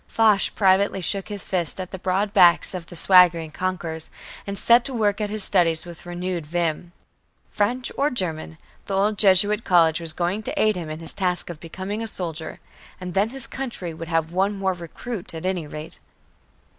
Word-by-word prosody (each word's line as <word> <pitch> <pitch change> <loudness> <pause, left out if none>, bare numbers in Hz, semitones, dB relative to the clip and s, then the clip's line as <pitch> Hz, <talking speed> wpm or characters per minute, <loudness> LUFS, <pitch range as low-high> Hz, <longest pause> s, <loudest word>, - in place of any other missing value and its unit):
Foch 215 -3 +2
privately 195 0 +3
shook 190 +4 -1
his 205 -2 -5
fist 175 -2 -1
at 185 -1 -6
the 190 - -7
broad 195 +3 -1
backs 175 -2 +5
of 175 -2 -6
the 175 - -11
swaggering 170 -3 +5
conquerors, 170 -2 -4 0.4
and 200 0 -4
set 235 +4 +5
to 260 +1 -3
work 210 -2 +1
at 210 - -1
his 215 -1 0
studies 170 -5 +3
with 175 0 -11
renewed 175 -1 -4
vim. 170 +1 -2 0.6
French 245 +5 0
or 285 +2 +3
German, 160 - -2 0.3
the 195 - -3
old 205 +2 +2
Jesuit 205 +2 +4
college 165 -3 +4
was 165 -1 -2
going 175 +5 -2
to - - -4
aid 215 -1 +3
him 170 -3 -5
in 155 +1 -6
his 165 - -6
task 180 -2 -2
of 160 - -10
becoming 190 +6 -6
a 225 - -3
soldier 165 -6 -3 0.4
and 180 -1 -6
then 200 +3 +2
his 265 0 -2
country 240 -11 -5
would 165 +1 -8
have 165 -1 -1
one 195 +3 0
more 190 -1 0
recruit 175 +3 -7
at 160 - -6
any 180 -4 -2
rate! 150 +2 -9
185 Hz, 195 wpm, -23 LUFS, 170-205 Hz, 0.6 s, backs